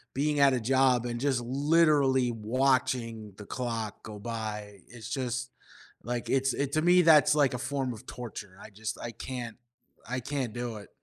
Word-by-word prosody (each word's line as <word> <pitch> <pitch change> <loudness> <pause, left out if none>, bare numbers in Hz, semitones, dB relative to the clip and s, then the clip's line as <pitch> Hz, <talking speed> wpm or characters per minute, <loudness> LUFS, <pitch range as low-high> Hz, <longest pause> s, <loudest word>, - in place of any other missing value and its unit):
being 145 +1 +1
at 140 -1 +6
a 125 - +1
job 130 0 +3
and 120 -1 -3
just 130 -3 +1
literally 140 -1 +3
watching 115 -2 0
the 105 - -9
clock 115 -4 -4
go 105 -1 -8
by. 105 -3 -5
It's 115 -2 -10
just 125 -1 -2 0.5
like, 120 +1 -3
it's 135 0 +2
it 140 -1 -1
to 155 - +2
me, 180 +1 +5
that's 155 -2 +6
like 140 -4 +3
a - - -2
form 135 -2 -2
of 110 - -12
torture; 105 -5 -8
I - - -10
just 110 +1 -5
I 120 - -5
can't 120 -1 -6 0.5
I 130 0 -1
can't 130 -4 -3
do 120 -2 -4
it. 100 - -12
125 Hz, 180 wpm, -29 LUFS, 115-135 Hz, 0.5 s, at